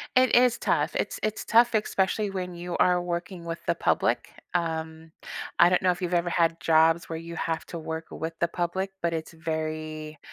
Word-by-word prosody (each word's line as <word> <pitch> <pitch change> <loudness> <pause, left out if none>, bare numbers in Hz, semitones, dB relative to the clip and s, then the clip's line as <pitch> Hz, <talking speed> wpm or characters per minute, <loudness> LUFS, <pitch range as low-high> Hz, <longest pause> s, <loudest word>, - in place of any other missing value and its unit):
It 255 -2 +5
is 245 -1 +5
tough, - - +1
it's - - -2
it's 215 0 -2
tough, 235 +2 +5
especially 210 -1 +1
when 185 -2 -4
you 175 0 -4
are 180 -1 +4
working 175 0 -4
with 165 0 -4
the - - +2
public. - - +1 0.2
Um, 160 -1 -3 0.5
I 175 +1 +7
don't 180 - +3
know 185 - +3
if 180 +1 -2
you've 180 0 -2
ever 175 0 +2
had 165 -1 +1
jobs 165 +1 +4
where 160 -1 -4
you 165 0 -8
have 165 0 -2
to 170 - -6
work 160 0 -5
with 160 +2 -5
the 170 - +1
public, 180 +3 -2
but 170 -1 0
it's 160 +1 -4
very 155 -1 -4
170 Hz, 200 wpm, -27 LUFS, 160-180 Hz, 0.5 s, I